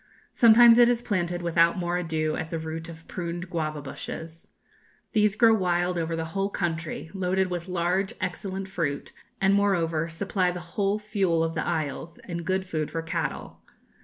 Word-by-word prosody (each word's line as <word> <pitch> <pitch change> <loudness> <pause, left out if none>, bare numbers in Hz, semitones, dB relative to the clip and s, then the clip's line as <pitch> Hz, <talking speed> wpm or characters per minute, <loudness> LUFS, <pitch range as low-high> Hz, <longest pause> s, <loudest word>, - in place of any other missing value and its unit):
Sometimes 235 0 +7
it 240 0 +7
is 240 -1 +1
planted 175 -5 -1
without 170 0 +3
more 175 -1 -1
ado 160 -3 -1
at 160 - -4
the 165 - -3
root 160 +1 -5
of 165 -1 -12
pruned 175 0 -5
guava 155 -3 -2
bushes. 160 +3 -8 0.7
These 210 -2 +3
grow 230 0 +6
wild 180 -3 +1
over 165 -1 -1
the 165 0 -2
whole 195 0 0
country, 165 -3 -3
loaded 190 -1 0
with 175 0 -3
large, 180 +2 0
excellent 190 +1 -4
fruit, 165 -7 -3 0.3
and, 195 0 +3
moreover, 170 -5 +1
supply 185 +2 0
the 180 0 -4
whole 200 0 +1
fuel 200 -6 0
of 165 0 -1
the 160 - -1
isles, 160 0 -3
and 170 -1 -5
good 190 0 0
food 155 -4 -2
for 165 0 -3
cattle.... 165 0 -4
175 Hz, 170 wpm, -26 LUFS, 165-195 Hz, 0.7 s, Sometimes